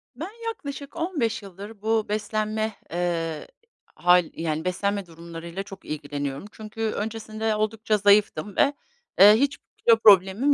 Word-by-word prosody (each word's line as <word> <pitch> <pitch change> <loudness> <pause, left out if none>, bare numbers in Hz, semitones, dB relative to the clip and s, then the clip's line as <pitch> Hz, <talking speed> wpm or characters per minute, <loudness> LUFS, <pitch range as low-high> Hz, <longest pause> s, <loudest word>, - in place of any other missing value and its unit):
Ben, 330 +9 -6 0.2
yaklaşık 285 -9 -6
15 315 - -1
yıldır 200 +2 -11
bu 220 -1 0
beslenme, 215 0 -2 0.2
eee, 165 -2 -2 0.5
hâl 180 0 +5
yani, 160 0 -3
beslenme 200 +2 -1
durumlarıyla 170 +2 -8
çok 195 -1 -12
ilgileniyorum. 145 0 -4
Çünkü 220 0 -9
öncesinde 220 0 -2
oldukça 215 0 0
zayıftım 200 -2 +3
ve, 285 - +4 0.5
eee, 205 +2 +10
hiç 275 +5 +1 0.2
kilo 230 -1 +5
problemim 205 +6 +5
210 Hz, 125 wpm, -25 LUFS, 180-225 Hz, 0.5 s, eee